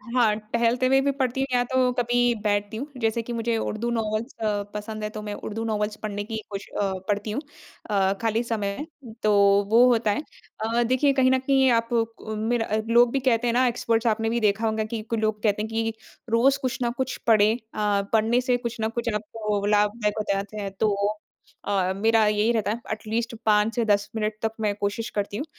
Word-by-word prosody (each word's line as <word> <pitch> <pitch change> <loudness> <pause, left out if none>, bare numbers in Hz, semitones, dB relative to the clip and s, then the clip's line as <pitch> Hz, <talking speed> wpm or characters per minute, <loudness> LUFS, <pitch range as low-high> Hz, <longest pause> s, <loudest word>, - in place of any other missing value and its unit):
हाँ, 225 -4 +4 0.2
टहलते 235 +2 +2
हुए 270 +1 +4
भी 280 - +1
पढ़ती 260 0 0
हूँ 270 - 0
या 245 0 +3
तो 255 -1 +3
कभी 245 0 0 0.3
बैठती 205 0 0
हूँ। 275 +5 -4
जैसे 225 +1 +1
कि 240 - -5
मुझे 230 0 -1
उर्दू 225 +2 -2
नोवेल्स 225 +2 -2
अ, 205 -2 0
पसंद 215 +1 -5
है 210 - -2
तो 215 -1 -7
मैं 210 -1 -5
उर्दू 220 +2 -5
नोवेल्स 210 -1 -1
पढ़ने 205 -1 -3
की 220 +1 -5
कोश 195 0 -5
अ, 195 -1 0
पढ़ती 205 +1 -1
हूँ 260 +8 -2 0.5
अ, 195 -1 +2
खाली 225 +1 +1
समय, 220 +3 -3 0.4
तो 215 - +3 0.4
वो 235 +2 +7
होता 225 -3 +2
है। 205 - -1 0.4
अ, 235 +2 +1
देखिए 260 +4 +2
कहीं 260 -1 +3
न 260 - +3
कहीं 265 0 +3
आप 230 0 +1
कु 225 -1 -2
मेरा 225 +2 0 0.2
लोग 240 0 +5
भी 275 - +1
कहते 245 -2 +1
हैं 235 - +1
ना, 255 +1 +3
एक्सपर्ट्स 230 -1 0
आपने 225 0 +1
भी 235 +1 0
देखा 215 +1 +1
होंगा 220 0 0
कि 220 -1 -4
लोग 215 -1 -1
कहते 210 -1 +2
हैं 220 - -3
कि 225 0 -1 0.4
रोज़ 255 +5 +3
कुछ 255 -2 -2
ना 240 - +1
कुछ 260 0 -2
पढ़ें 215 0 +5 0.2
अ, 205 -1 +1
पढ़ने 225 +3 +3
से 250 -1 +1
कुछ 235 -2 -5
ना 220 - +1
कुछ 235 +1 -3
आपको 210 -1 -2
लाभदायक 210 +1 +1
हो - - 0
जाते 200 +2 -4
हैं 195 - -4
तो 210 -2 +2 0.7
अ, 190 -2 +1
मेरा 220 +2 +3
यही 210 +2 +2
रहता 215 -3 0
है 225 - -3
एट 215 - -3
लीस्ट 230 +1 -2
5 210 +1 +3
से 235 - +1
10 205 -1 +2
मिनट 215 -1 -1
तक 225 - 0
मैं 210 -1 +1
कोशिश 205 +3 -2
करती 205 0 -2
हूँ। 285 - -3
225 Hz, 215 wpm, -25 LUFS, 210-235 Hz, 0.7 s, वो